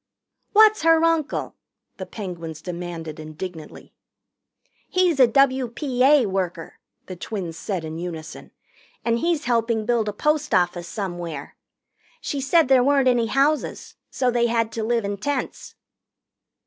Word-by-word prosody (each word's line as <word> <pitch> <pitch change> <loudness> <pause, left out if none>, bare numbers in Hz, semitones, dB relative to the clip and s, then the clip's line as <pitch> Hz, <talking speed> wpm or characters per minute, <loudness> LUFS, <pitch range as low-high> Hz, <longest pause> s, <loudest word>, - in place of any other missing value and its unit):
"What's 430 0 +6
her 325 0 +4
uncle?" 330 -3 0 0.4
the - - -7
Penguins 170 -6 -7
demanded 170 -3 -6
indignantly. 155 +1 -9 1.0
"He's 360 -5 +2
a 255 - +8
W.P.A. 260 +1 +3
worker," 185 -4 -4 0.3
the 185 - -7
twins 175 -2 -5
said 180 -1 -4
in 160 +1 -6
unison, 170 -3 -7 0.6
"and 230 0 +1
he's 330 0 0
helping 230 -2 +1
build 230 -2 +1
a - - -5
post 300 +1 0
office 175 -1 +1
somewhere. 175 -8 -5 0.6
She 280 - -3
said 300 +3 +3
there 260 -2 +5
weren't 275 -1 +3
any 240 -2 +3
houses, 280 +5 0
so 255 -2 0
they 235 0 +2
had 230 -1 0
to 225 - -4
live 230 -1 0
in 200 0 -3
tents." 270 +6 -4
230 Hz, 135 wpm, -23 LUFS, 175-275 Hz, 1.0 s, a